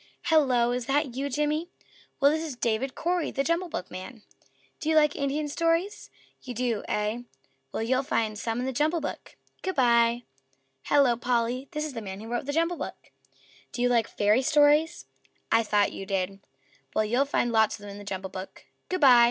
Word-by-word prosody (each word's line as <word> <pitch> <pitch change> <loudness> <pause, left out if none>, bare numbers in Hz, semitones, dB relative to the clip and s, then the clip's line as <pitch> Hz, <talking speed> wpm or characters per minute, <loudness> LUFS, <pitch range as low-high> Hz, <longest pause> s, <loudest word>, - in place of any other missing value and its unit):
"Hello! 250 -6 +4
Is 245 -1 -3
that 280 -2 +1
you, 275 +3 -2
Jimmy?" 300 +4 -1 0.5
"Well, 280 0 +5
this 315 +1 0
is 305 -5 -5
David 240 +2 -1
Cory, 350 0 0
the 275 - -1
JUMBLE 335 +3 0
BOOKman. 185 - -7 0.6
Do 315 - -2
you 320 - +3
like 300 -1 +4
Indian 285 +2 -1
stories? 335 +7 -1 0.3
You 250 -2 -7
do, 235 -3 -1
eh? 210 +2 -1 0.5
Well, - - -2
you'll 255 +3 +2
find 225 -6 -1
some 225 +2 -3
in 250 - -2
the 265 - -2
JUMBLE 310 +6 +1
BOOK. 290 - -6 0.2
Good 375 -1 -3
by!" 235 -2 +3 0.6
"Hello, 275 -4 +4
Polly!" 245 +2 -1
"This 300 0 -3
is 305 - -6
the 230 - -5
man 195 -2 -7
who 220 - -9
wrote 240 +3 -3
the - - 0
JUMBLE 335 +3 +1
BOOK. - - -8 0.6
Do 245 - -2
you 245 - +3
like 230 -2 +2
Fairy 210 +4 +2
Stories? 295 +3 +3 0.5
I 225 - +5
thought 210 -2 +1
you 195 - -7
did. 195 0 -2 0.6
Well, 215 - +2
you'll 245 +6 +2
find 245 -4 0
lots 220 -2 +3
of - - -15
them 205 -1 -8
in 200 - -9
the - - -9
JUMBLE 190 -1 -5
BOOK. 185 +1 -9 0.2
Good 370 -2 -2
by." 255 -4 +8
250 Hz, 195 wpm, -27 LUFS, 225-295 Hz, 0.6 s, by